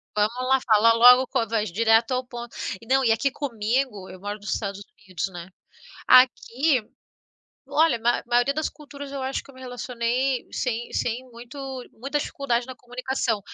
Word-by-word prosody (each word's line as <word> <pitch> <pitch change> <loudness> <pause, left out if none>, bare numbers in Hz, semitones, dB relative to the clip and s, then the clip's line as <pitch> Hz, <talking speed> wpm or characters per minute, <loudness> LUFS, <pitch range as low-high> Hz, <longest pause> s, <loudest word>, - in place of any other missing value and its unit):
Vamos 230 +5 0
lá, 265 0 +5
fala 225 0 +5
logo, 250 +2 +7
co 230 - -1
vai 220 0 0
direto 225 +5 +3
ao 255 0 -1
ponto. 240 -1 -9 0.3
E, - - -14
não, 265 +1 +3
e 230 - +4
aqui 230 +5 +1
comigo, 235 -5 -2
eu 185 - -11
moro 205 +2 -5
nos 205 - -3
Estados 200 -2 -4 0.2
Unidos, 185 0 -3
né, 175 -2 -9 0.6
aqui, 255 +1 +4 0.9
olha, 310 -6 +3
mai 235 +2 +1
maioria 245 +3 +2
das 310 0 -1
culturas, 285 -1 -10
eu 275 - -4
acho 265 +1 -2
que - - -16
eu 275 - -19
me 260 - -14
relacionei 250 +1 -2
sem 240 -2 -3
sem 245 +2 -2
muito 240 +3 -11 0.3
muita 275 +5 -3
dificuldade 245 -4 -2
na 260 - -8
comunicação. 245 -3 -2
245 Hz, 175 wpm, -24 LUFS, 225-265 Hz, 0.9 s, logo